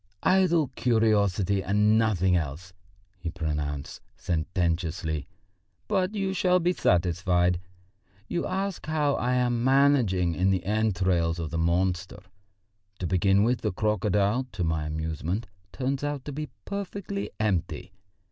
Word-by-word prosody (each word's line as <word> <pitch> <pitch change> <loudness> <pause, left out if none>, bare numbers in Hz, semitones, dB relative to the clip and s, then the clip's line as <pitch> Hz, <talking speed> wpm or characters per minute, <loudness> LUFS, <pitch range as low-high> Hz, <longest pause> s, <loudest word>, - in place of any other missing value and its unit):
"Idle 175 -6 +3
curiosity 105 -6 +2
and 105 +2 +3
nothing 95 -5 +2
else," 85 +3 -3 0.5
he 85 -1 -4
pronounced 75 -4 -4 0.2
sententiously, 80 -3 -1 0.6
"but 195 0 0
you 195 -2 -1
shall 180 -1 +3
be 175 +1 +1
satisfied. 90 - +2 0.7
You 175 - -2
ask 190 0 -3
how 150 -2 +1
I 125 +1 0
am 120 -1 +1
managing 130 -10 +3
in 95 +3 +1
the 95 -2 +1
entrails 95 -5 +1
of 80 -3 -4
the 85 - -2
monster? 90 +2 0 0.7
To 90 - -4
begin 95 +3 +3
with, 120 +2 +1
the 105 - 0
crocodile, 105 +4 +1
to 90 - -2
my 80 -2 -1
amusement, 80 +7 -3 0.3
turns 135 +1 -2
out 145 -2 -3
to 145 - -5
be 150 +1 -5 0.2
perfectly 200 0 -4
empty. 90 -3 -1
100 Hz, 130 wpm, -27 LUFS, 85-130 Hz, 0.7 s, Idle